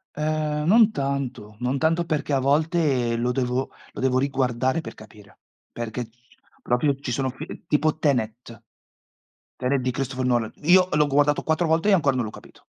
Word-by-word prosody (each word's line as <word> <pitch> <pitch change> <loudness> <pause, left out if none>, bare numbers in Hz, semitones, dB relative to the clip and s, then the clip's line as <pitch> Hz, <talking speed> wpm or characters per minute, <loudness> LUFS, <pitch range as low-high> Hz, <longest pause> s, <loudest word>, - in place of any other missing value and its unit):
Ehm, 150 0 -1
non 220 +3 +6
tanto, 135 - -3
non 125 +3 -1
tanto 165 +3 +1
perché 150 -3 -1
a - - +3
volte 140 -4 +1
lo 120 +1 0
devo 125 +1 -1 0.2
lo - - -7
devo 130 -1 +2
riguardare 130 +2 0
per - - -8
capire, 105 -2 -16 0.3
perché 120 +1 -4
ci 120 +2 -34
sono - - -29
proprio 135 +4 +1
ci 130 - -5
sono 130 +1 -1
fi 145 +4 -8
ehm, - - -10
tipo 155 0 +1
Tenet, 115 -4 -2 1.0
Tenet 130 +2 0
di 125 0 -1
Christopher 130 0 -3
Nolan. 120 -3 +1
Io 180 +2 +5
l'ho 150 0 +3
guardato 145 +1 +2
4 160 +1 +1
volte 165 +6 +2
e - - +5
ancora 145 -7 +3
non 125 - 0
l'ho 110 - -6
capito. - - -15
135 Hz, 185 wpm, -24 LUFS, 125-155 Hz, 1.0 s, non